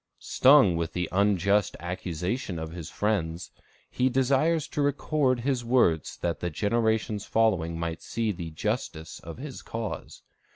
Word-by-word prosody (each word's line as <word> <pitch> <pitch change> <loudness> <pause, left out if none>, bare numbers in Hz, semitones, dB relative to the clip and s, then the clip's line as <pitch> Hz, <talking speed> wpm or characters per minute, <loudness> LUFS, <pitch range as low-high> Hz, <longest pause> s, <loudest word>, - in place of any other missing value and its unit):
Stung 130 - +5
with 85 0 -2
the 90 -1 -1
unjust 100 0 +2
accusation 90 +3 -3
of 80 0 -5
his 85 -2 -7
friends, 90 -6 -2 0.4
he 130 +1 +1
desires 140 +5 +2
to 150 - -2
record 140 -2 +1
his 130 -1 0
words 115 - +2
that 85 -2 -2
the 90 - -2
generations 110 +2 0
following 95 -8 +1
might 85 0 -3
see 115 -1 -1
the 85 -3 -6
justice 80 0 -4
of 85 0 -9
his 135 +1 -7
cause. 115 -1 -6
105 Hz, 140 wpm, -27 LUFS, 85-125 Hz, 0.4 s, Stung